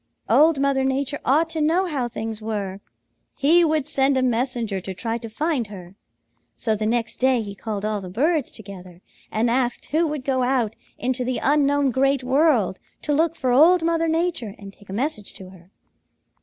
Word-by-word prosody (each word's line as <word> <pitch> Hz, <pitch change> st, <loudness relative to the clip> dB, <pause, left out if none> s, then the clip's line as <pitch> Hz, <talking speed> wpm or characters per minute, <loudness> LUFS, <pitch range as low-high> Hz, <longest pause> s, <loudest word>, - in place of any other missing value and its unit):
Old 290 Hz, +6 st, +5 dB
Mother 275 Hz, -1 st, +1 dB
Nature 275 Hz, +2 st, -1 dB
ought 310 Hz, +5 st, +3 dB
to 320 Hz, -1 st, -2 dB
know 335 Hz, +5 st, +2 dB
how 280 Hz, -8 st, -2 dB
things 220 Hz, -1 st, -5 dB
were. 200 Hz, -3 st, -4 dB, 0.6 s
He 330 Hz, +5 st, +4 dB
would 310 Hz, -3 st, +1 dB
send 270 Hz, -1 st, +2 dB
a 260 Hz, -, +2 dB
messenger 235 Hz, -5 st, -1 dB
to 190 Hz, +1 st, -6 dB
try 230 Hz, +4 st, -3 dB
to 230 Hz, -1 st, -8 dB
find 280 Hz, 0 st, -1 dB
her. 185 Hz, -3 st, -11 dB, 0.6 s
So 220 Hz, -2 st, 0 dB
the 215 Hz, 0 st, -2 dB
next 235 Hz, 0 st, -1 dB
day 255 Hz, -2 st, +2 dB
he 200 Hz, -1 st, -7 dB
called 210 Hz, 0 st, -5 dB
all 215 Hz, -1 st, -1 dB
the 185 Hz, -, -8 dB
birds 290 Hz, -, 0 dB
together 185 Hz, -4 st, -11 dB, 0.3 s
and 220 Hz, +2 st, +1 dB
asked 245 Hz, +1 st, 0 dB
who 325 Hz, +2 st, +2 dB
would 295 Hz, -3 st, -4 dB
go 260 Hz, -2 st, +1 dB
out 245 Hz, -4 st, 0 dB, 0.2 s
into 255 Hz, +1 st, -1 dB
the 250 Hz, 0 st, -1 dB
unknown 285 Hz, -1 st, +2 dB
Great 270 Hz, +1 st, +1 dB
World 260 Hz, -, +2 dB, 0.2 s
to 295 Hz, -, 0 dB
look 325 Hz, +3 st, +1 dB
for 260 Hz, -5 st, -1 dB
Old 325 Hz, +7 st, +5 dB
Mother 330 Hz, 0 st, +1 dB
Nature 320 Hz, -, -1 dB
and 200 Hz, -1 st, -11 dB
take 205 Hz, -, -20 dB
a -, -, -6 dB
message 220 Hz, -1 st, -3 dB
to 185 Hz, -1 st, -11 dB
her. 180 Hz, -1 st, -17 dB
255 Hz, 190 wpm, -23 LUFS, 215-295 Hz, 0.6 s, Old